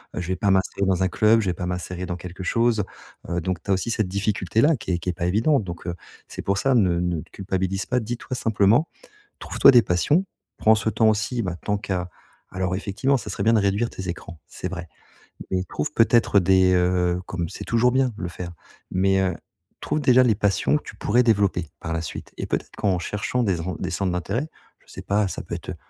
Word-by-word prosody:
heu, - - -2
je 85 - -5
vais 95 - +1
pas 100 0 +2
m'inscrire 95 +1 +1
dans 95 -1 +1
un 95 - +2
club, 110 +5 +4
je 100 - -3
vais - - 0
pas 90 - -5
m'insérer 90 0 -4
dans 90 - -3
quelque 90 +1 -8
chose». 115 +1 +2 0.5
Heu, 85 0 -1
donc 90 -1 -3
tu 100 - -2
as - - +5
aussi 95 +5 -1
cette 110 -3 0
difficulté-là 105 - +1
qui 105 - -5
est 85 - 0
qui 90 - -4
est - - 0
pas 85 0 -3
évidente 110 - +2
donc 85 -2 -7
heu, 85 - -2 0.3
c'est - - -7
pour 100 0 0
ça 135 +4 +2
ne 90 -7 +3
ne 90 -2 -1
te - - -16
culpabilise 95 0 -2
pas. 125 0 +1
Dis-toi 120 +3 -5
simplement 115 +7 +3 0.5
trouves-toi - - +5
des 125 -3 +7
passions, 145 - +2 0.3
prends 110 0 +5
ce 110 - -1
temps 110 +1 +3
aussi, 110 +3 -1
bah, 90 -4 -3
tant 105 - 0
qu'à 95 -3 -3 0.4
alors 95 0 -2
effectivement 130 +8 0
ça - - -8
serait - - -3
bien 115 - +4
de 110 - +4
réduire 100 +4 +1
tes 95 0 -7
écrans. 85 -2 -7
C'est 90 - -6
vrai. 90 -2 -6 0.6
Mais 95 -1 0
trouves 75 -4 -3
peut-être 115 -2 +4
des, 95 0 +4
heu, 90 0 +2
comme 85 -2 -3
c'est - - -8
toujours 115 +2 +2
bien 130 0 +3
de - - -7
le 90 - -2
faire. 90 0 -7 0.4
Mais 95 +1 +2
heu 95 -2 +1 0.5
trouves 155 - -1
déjà 130 -2 +5
les 120 -4 +3
passions 105 +7 +1
que 150 - -3
tu - - -10
pourrais 120 +4 +2
développer, 100 -8 +1
par 80 - -4
la 80 - -2
suite. 80 - -7
Et - - -3
peut-être - - -3
qu'en 95 -3 +1
cherchant 105 +6 -2
des 95 -7 0
en 90 -1 -4
des - - -4
centres 95 -3 -1
d'intérêt, 105 - -2 0.4
je - - -16
sais - - -8
pas 105 +1 +1
ça - - -5
peut - - -6
être, - - -7
heu, - - -5
95 Hz, 235 wpm, -24 LUFS, 90-115 Hz, 0.6 s, des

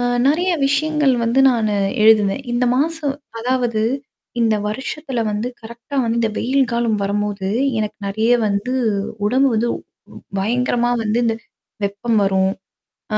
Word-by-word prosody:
அ - - 0 0.3
நெறைய 350 +5 +2 0.2
விஷயங்கள் 290 -1 +2
வந்து 235 +4 +2
நானு 220 -4 0 0.3
எழுதுவேன். 215 +2 +4
இந்த 250 +1 +2
மாசம் 300 -1 0 0.3
அதாவது 245 -2 0 0.6
இந்த 225 -2 +3
வருஷத்துல 265 +2 -4
வந்து 215 +4 -2
கரெக்ட்டா 235 +5 -8
வந்து 230 0 0
இந்த 225 - +2
வெயில் 265 +1 +1
காலம் 235 -3 +1
வரும்போது, 200 -1 -2 0.3
எனக்கு 215 -1 -3
நெறைய 220 +4 +1 0.2
வந்து 200 +5 -1 0.5
உடம்பு 265 +5 +3
வந்து 225 +2 +1 0.7
பயங்கரமா 240 +3 +1
வந்து 215 +2 +1
இந்த 225 -1 +1 0.5
வெப்பம் 210 +3 -1
வரும். 190 0 +2 0.6
ஆ - - +3
235 Hz, 130 wpm, -19 LUFS, 215-260 Hz, 0.7 s, எழுதுவேன்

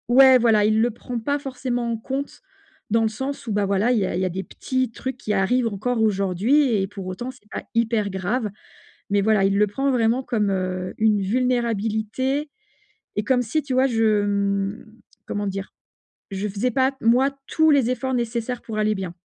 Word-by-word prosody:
ouais, 265 -1 +8
voilà, 220 -3 +4
il 220 +1 +3
le 240 - +3
prend 235 +2 -6
pas 285 +6 -1
forcément 250 -3 -3
en 230 - -1
compte 270 +5 -5 0.5
dans 225 +1 +3
le - - +3
sens 265 +5 -5
où, 225 - -4
bah, 205 -1 +1
voilà, 200 +5 +2
il 240 - +3
y 190 - +1
a - - -3
il 185 - -1
y - - +1
a - - 0
des 190 +2 -4
petits 260 -2 -2
trucs 260 +3 -5
qui 215 - -4
arrivent 230 +6 +2
encore 225 +3 -1
aujourd'hui 215 +7 +2
et 195 -1 0
pour 195 -2 -8
autant 190 +7 -5
c'est 210 - -22
pas - - -5
hyper 225 -3 +1
grave. 205 +5 -2 0.6
Mais 200 0 +3
voilà, 210 -1 +3
il 195 +1 +2
le 210 - +4
prend 270 +7 -1
vraiment 235 0 +2
comme, 215 -5 0
heu, 185 -1 -2
une 215 -2 +3
vulnérabilité 235 +4 0 0.7
et 210 - +1
comme 250 +2 +3
si, 250 +7 -1
tu 275 -2 -4
vois, 260 +1 +4
je, 220 -3 +2
mmh, 200 +1 -1 0.4
comment 205 0 -3
dire? 195 0 -5 0.6
He 195 +2 -3
faisais 215 +6 -1
pas, 260 +2 +2
moi 245 +4 +4 0.2
tous 315 0 +3
les 270 -5 +4
efforts 260 0 -2
nécessaires 235 +1 -2
pour 215 -2 -4
aller 215 0 +2
bien. 185 -3 -5
225 Hz, 200 wpm, -23 LUFS, 200-255 Hz, 0.7 s, ouais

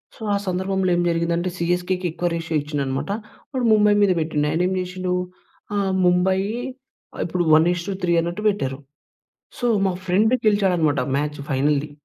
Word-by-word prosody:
So, - - -19
ఆ - - +3
సందర్భంలో 190 +1 0
ఏం 175 - +1
జరిగిందంటే 170 +1 0
సీఎస్‌కేకి 180 +1 -1
ఎక్కువ 175 +1 -2
రేషియో 165 -1 -3
ఇచ్చిండనమాట. 145 +3 -3 0.4
వాడు 255 -3 -1
ముంబై 210 -1 +5
మీద 200 -2 +4
పెట్టిండు. 150 -2 0
ఆయనేమి 180 +3 +1
జేసిండు 180 0 -3 0.6
ఆహ్, 195 -2 0
ముంబయి 190 +2 +2 0.8
ఇప్పుడు 175 +1 -1
1:3 175 +2 +1
అన్నట్టు 175 +5 -4
పెట్టారు. 135 -9 -2 0.8
సో, 245 - 0 0.2
మా 185 - +1
ఫ్రెండ్ 215 +7 +3
గెలిచాడనమాట 180 -9 +2 0.2
మ్యాచ్ 150 +1 -2
ఫైనల్‌ది. 145 +2 +1
180 Hz, 135 wpm, -22 LUFS, 160-190 Hz, 0.8 s, ముంబై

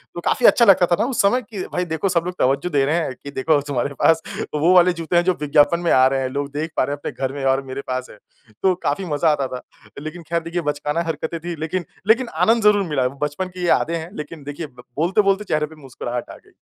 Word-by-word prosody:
तो - - -4
काफ़ी 245 - +1
अच्छा 235 - +6
लगता 190 -4 +6
था 175 - +2
ना - - +2
उस 260 - +1
समय 205 +5 +3
की 205 -4 -7
भाई 180 - 0
देखो 160 +3 -1
सब 170 -2 +1
लोग 180 - -3
तवज्जो 140 +7 +1
दे 145 -4 +2
रहे 150 +4 +1
हैं 160 -6 -1
कि 140 - -7
देखो 145 +2 +2
तुम्हारे 140 0 -1
पास 165 0 +4 0.3
वो 160 +5 +3
वाले 180 0 +6
जूते 165 0 -3
है 175 - +4
जो 185 - +3
विज्ञापन 150 +3 +3
में 175 -1 0
आ 130 0 +6
रहे 135 0 0
हैं। 130 - -1
लोग 140 +1 -3
देख 155 +3 -3
पा - - +4
रहे 140 +2 -2
हैं - - -4
अपने - - -5 0.2
घर 130 - -9
में 140 -1 -5
और 135 0 +2
मेरे 130 +1 -5
पास 130 0 -2
है। - - -13 0.5
तो 190 - +4
काफ़ी 145 +7 -1
मज़ा 155 0 +1
आता 140 -3 0
था। 125 - -6 0.4
लेकिन 155 +3 -7
खैर 170 0 +1
देखिए 170 +1 -3
बचकाना 150 +1 -1
हरकतें 165 +1 -3
थी। 170 +1 -5
लेकिन 170 +3 -3 0.2
लेकिन 235 +3 +4
आनंद 225 0 +3
ज़रूर 210 -1 +5
मिला 140 -4 +1
है। 125 - +1
बचपन 150 +5 -2
की 180 0 -12
ये 175 - 0
यादें 170 0 +2
हैं 165 +1 -7
लेकिन 150 0 -7
देखिए 145 +3 -6
ब 125 -3 -16
बोलते 175 +7 +3
बोलते 195 0 +1
चेहरे 155 -6 0
पे 160 +1 -14
मुस्कुराहट 125 -2 -5
आ - - -9
गई। - - -22
160 Hz, 270 wpm, -21 LUFS, 145-180 Hz, 0.5 s, अच्छा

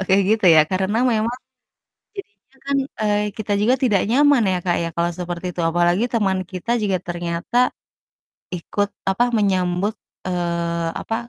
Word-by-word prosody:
kalau 190 - -2
kayak 195 0 +4
gitu 220 -4 +2
ya - - +8
karena 190 +4 0
memang 225 +3 0 0.8
jadinya 250 - -12
kan, 280 0 0 0.2
eee, 210 -1 +2 0.2
kita 210 -1 -4
juga 240 +4 +3
tidak 205 -7 +3
nyaman 280 -1 +4
ya, 180 - +1
Kak, 175 - +1
ya - - -1
kalau 170 0 0
seperti 175 0 -5
itu 175 - -3
apalagi 175 +5 +2
teman 195 -4 +1
kita 185 +5 -7
juga 195 -3 +1
ternyata 170 +5 -3 1.0
ikut, 205 +4 -2 0.2
apa, 235 +6 +2
menyambut, 190 +1 0 0.3
eee, 170 -2 -1
apa 225 - -4
190 Hz, 155 wpm, -21 LUFS, 175-220 Hz, 1.0 s, ya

